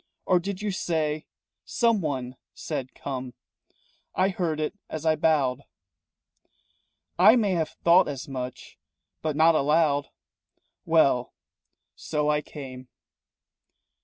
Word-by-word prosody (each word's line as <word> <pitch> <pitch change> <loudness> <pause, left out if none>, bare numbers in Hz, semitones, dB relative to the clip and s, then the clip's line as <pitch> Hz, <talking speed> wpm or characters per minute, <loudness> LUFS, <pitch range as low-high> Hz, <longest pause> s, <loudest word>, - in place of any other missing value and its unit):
Or 180 - +4
did 195 +2 -5
you 210 - -1
say 155 -4 -2 0.4
Someone 150 - 0 0.2
said 135 -5 -5
'Come' 130 -3 -6 0.8
I 190 - +3
heard 170 -5 -2
it 155 - -1 0.2
as 160 0 -5
I 160 -1 +4
bowed." 145 -5 +1 1.6
"I 210 +6 +8
may 215 -5 +2
have 165 -4 0
thought 170 +2 +6
as 140 -2 -5
much, 130 -2 -7 0.4
but 155 -2 -2
not 160 +2 +5
aloud." 150 -1 +2 0.8
"Well, 140 -7 +2 0.6
so 150 -1 -1
I 150 0 +1
came." 130 -4 -9
155 Hz, 110 wpm, -26 LUFS, 140-170 Hz, 1.6 s, I